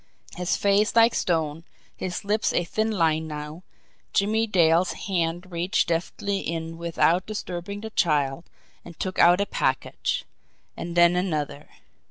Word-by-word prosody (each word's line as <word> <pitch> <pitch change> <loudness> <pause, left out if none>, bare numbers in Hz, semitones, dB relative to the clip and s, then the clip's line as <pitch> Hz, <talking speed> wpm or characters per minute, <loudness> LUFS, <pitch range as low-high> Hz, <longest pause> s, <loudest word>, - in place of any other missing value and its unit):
His 180 0 -1
face 205 +2 +2
like 230 0 +6
stone, 160 -2 -1 0.3
his 185 +1 -5
lips 210 +2 +1
a - - +2
thin 215 +6 -1
line 160 -6 +1
now, 150 +2 -7 0.5
Jimmie 220 +3 +2
Dale's 175 -2 +3
hand 175 -1 -2
reached 170 +1 0
deftly 195 +4 -1
in 165 -1 -4
without 170 +1 +1
disturbing 200 -1 -5
the 220 0 -7
child 150 -5 +1 0.4
and 170 -2 -13
took 185 -1 -3
out 175 +2 +6
a 200 - +2
package - - -1 0.5
and 170 0 -6
then 175 0 +6
another. 155 -5 -2
175 Hz, 140 wpm, -25 LUFS, 165-200 Hz, 0.5 s, like